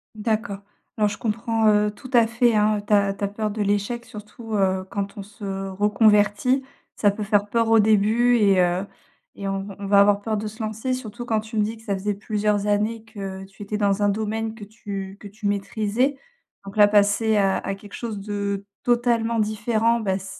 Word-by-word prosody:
D'accord. 215 -1 -2 0.4
Alors, 210 -1 +3
je 205 - -5
comprends, 225 0 0
heu, 210 0 +3
tout 255 +5 -12
à 235 -2 +5
fait, 230 +1 +2
hein, 210 0 +3
heu, - - -6
ta 200 -1 +2
ta 200 0 -2
peur 215 +1 -3
de 210 0 -2
l'échec 205 +4 -1
surtout, 215 +1 -9
heu, 190 -1 +1
quand 200 0 -4
on 200 - -6
se 195 -1 -6
reconvertit. 210 +5 +3 0.3
Ça 205 - +3
peut 205 +2 -5
faire 205 0 +1
peur 230 +1 +1
au 225 - +6
début 220 +3 +4
et 200 -4 +4
heu, 180 +2 +1 0.5
et 200 - -5
on 195 0 -2
v 200 -1 -8
on 200 - -6
va 200 0 +5
avoir 200 0 +4
peur 215 +1 -2
de 215 +1 -3
se 220 +2 -7
lancer, 220 +4 -3
surtout 240 -1 -5
quand 220 -2 0
tu 220 +1 -9
me 210 - +3
dis 220 +2 -3
que - - -17
ça 205 -3 -2
faisait 200 +2 -1
plusieurs 210 0 -1
années 210 +2 0
que 195 -3 -7
tu 195 +1 -14
étais 210 +1 -3
dans 205 -1 +1
un 205 - +4
domaine 220 +2 -2
que 220 -2 -9
tu 200 -2 -7
que 205 - -10
tu 205 +1 -7
maîtrisais. 215 +6 0 0.5
Donc, 195 - -9
là, 205 -1 +7
passer 210 +1 +3
à 195 -1 +2
à 195 - -3
quelque 200 +1 -13
chose 225 -4 -5
de 200 -1 -3 0.2
totalement 235 -1 +1
différent, 220 +2 +1
bah, 195 -3 0
c 190 - -10
210 Hz, 210 wpm, -23 LUFS, 200-225 Hz, 0.5 s, là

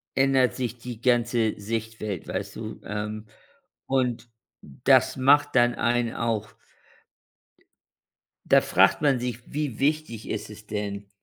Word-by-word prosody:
ändert 135 -1 +3
sich 125 -2 -3
die 120 -2 -8
ganze 120 -3 +1
Sichtwelt, 110 -2 -4
weißt - - -4
du, - - -7
ähm, 105 +1 -5 0.6
und 125 -3 0 0.3
das 70 - +2
macht 140 +2 +4
dann 120 -1 +4
einen 120 -1 0
auch 110 -2 -2 1.9
Da - - +5
fragt - - +3
man 140 -4 +3
sich: 120 -1 -3
„Wie 145 -5 -3
wichtig 140 -6 -1
ist 105 0 -4
es 105 0 -13
denn“ 100 -1 -4
115 Hz, 125 wpm, -25 LUFS, 110-125 Hz, 1.9 s, Da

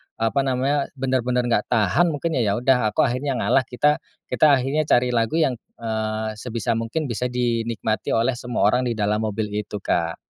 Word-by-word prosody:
apa 115 +5 0
namanya, 135 +2 0
benar-benar 125 -2 0
nggak 120 -3 0
tahan 115 - +2
mungkin 160 -2 -1
ya 105 -4 +1
udah 125 -1 +2
aku - - +4
akhirnya 130 +2 -1
ngalah, 130 0 +1
kita 150 +4 +2 0.3
kita 155 - +4
akhirnya 140 +4 -1
cari 125 -2 +3
lagu 115 +3 0
yang, 135 -7 +1 0.2
eee, 110 -1 -3
sebisa 115 -2 -3
mungkin 115 +7 -2
bisa 125 +2 -1
dinikmati 115 -3 -1
oleh 115 +3 +2
semua 125 -1 -2
orang 125 +5 +3
di 120 - -1
dalam 105 0 0
mobil 105 0 -3
itu, 105 0 -4
Kak. 85 -1 0
120 Hz, 175 wpm, -23 LUFS, 110-130 Hz, 0.3 s, aku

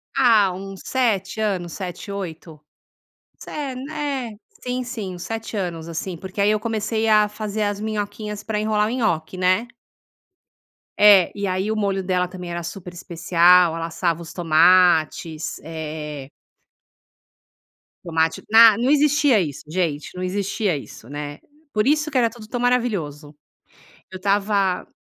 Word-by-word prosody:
Ah, 220 -7 +5
uns 195 +1 -8
7 220 -5 0
anos, 185 -5 -2
7, 185 +1 -6
8, 165 -5 -7 0.7
se - - -11 0.2
né, 275 -4 -4 0.3
sim, 250 0 -2
sim, 225 -7 -5
uns 175 - -9
7 225 0 -5
anos, 170 -5 -4
assim, 170 +1 -5
porque 190 +3 -5
aí 200 - +4
eu 215 0 +2
comecei 220 0 -1
a 210 -1 +4
fazer 210 0 -4
as 205 -1 -1
minhoquinhas 210 0 -4
pra 215 -2 -2
enrolar 215 0 +1
o - - -3
nhoque, 190 -8 -1
né? 185 +6 +2 1.3
É, 205 -3 +7
e 200 -1 -2
aí 190 +3 -1
o - - -1
molho 200 -2 -1
dela 180 -1 0
também 180 -1 -8
era 170 0 -4
super 180 +1 -8
especial. 175 0 +3
Ela 165 0 -3
assava 170 0 -1
os 165 - -9
tomates, 165 -2 +3
eh 150 -3 -6 1.7
Tomate, 160 -1 0
na 225 -2 +8
não 245 +3 +1
existia 295 -4 +4
isso, 150 -6 -5
gente, 155 -3 -2
não 180 - -6
existia 200 0 -1
isso, 120 - -11
né. 145 +1 -6 0.3
Por 215 +4 +1
isso 300 +1 +2
que 270 - 0
era 235 -2 +3
tudo 225 -2 -13
tão 245 +2 -4
maravilhoso, 195 - -1 0.8
eu 190 - -6
estava 195 -1 0
195 Hz, 145 wpm, -22 LUFS, 170-220 Hz, 1.7 s, na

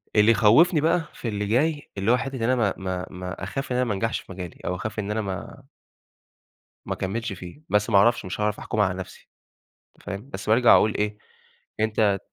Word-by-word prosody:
اللي 105 +2 +6
يخوفني 145 - +5
بقى 165 +2 +3
في 120 - -6
اللي 105 -1 -2
جاي، 145 +7 +1
اللي 100 +4 +2
هو 125 - +5
حتة 135 +1 -4
إن 120 - -5
أنا 130 +3 +3
ما 110 -6 +1
ما 95 -1 -3
ما 90 0 -7
أخاف 135 -1 -4
إن - - +1
أنا 125 - +2
ما 110 - -1
انجحش 115 +3 -1
في - - -13
مجالي، 90 -2 -8
أو 90 - -1
أخاف 110 +4 -5
إن 105 0 -3
أنا 110 +1 -1
ما 100 +7 -6 1.2
ما - - -2
اكملش 110 +3 -3
فيه، 90 - -10
بس 105 0 +2
ما - - +5
اعرفش، 120 +3 +4
مش 90 - -5
هاعرف 105 0 0
أحكم 110 - -4
على 95 -3 +3
نفسي، 95 - -10 0.7
فاهم؟ 100 +6 -7
بس 100 -3 -6
بارجع 120 +2 +6
أقول 105 - +3
إيه 105 0 -1 0.6
أنت 110 -2 +2
105 Hz, 210 wpm, -25 LUFS, 100-120 Hz, 1.2 s, اللي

